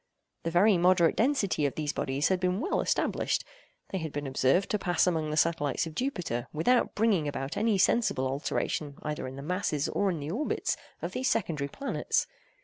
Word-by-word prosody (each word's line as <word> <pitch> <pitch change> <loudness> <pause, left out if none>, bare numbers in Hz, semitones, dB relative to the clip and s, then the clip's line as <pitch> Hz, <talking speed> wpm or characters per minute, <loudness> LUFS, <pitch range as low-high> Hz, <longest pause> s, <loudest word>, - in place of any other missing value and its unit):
The 165 - -2
very 180 +3 +4
moderate 175 -1 +4
density 220 - +2
of 140 - -5
these 150 -2 -2
bodies 135 +2 0
had 190 -1 +2
been 180 +1 0
well 365 - 0
established. - - 0 0.5
They 190 - -2
had 160 -2 -4
been 145 0 -4
observed 135 +7 +2
to 210 - +1
pass 175 -3 +2
among 160 -4 0
the 155 - -2
satellites 160 -3 +1
of 165 - -7
Jupiter, 170 - -2
without 240 +11 +2
bringing 205 -8 +2
about 135 -1 -4
any 215 -1 +2
sensible 190 - +2
alteration 140 +2 -2
either 150 -3 -3
in 130 - -7
the 140 - -7
masses 165 -3 -1
or 200 - 0
in 170 -4 -2
the 145 +2 -4
orbits 265 - -1 0.3
of - - -2
these 260 0 0
secondary 160 -10 0
planets. 275 - -1
165 Hz, 190 wpm, -29 LUFS, 145-200 Hz, 0.5 s, very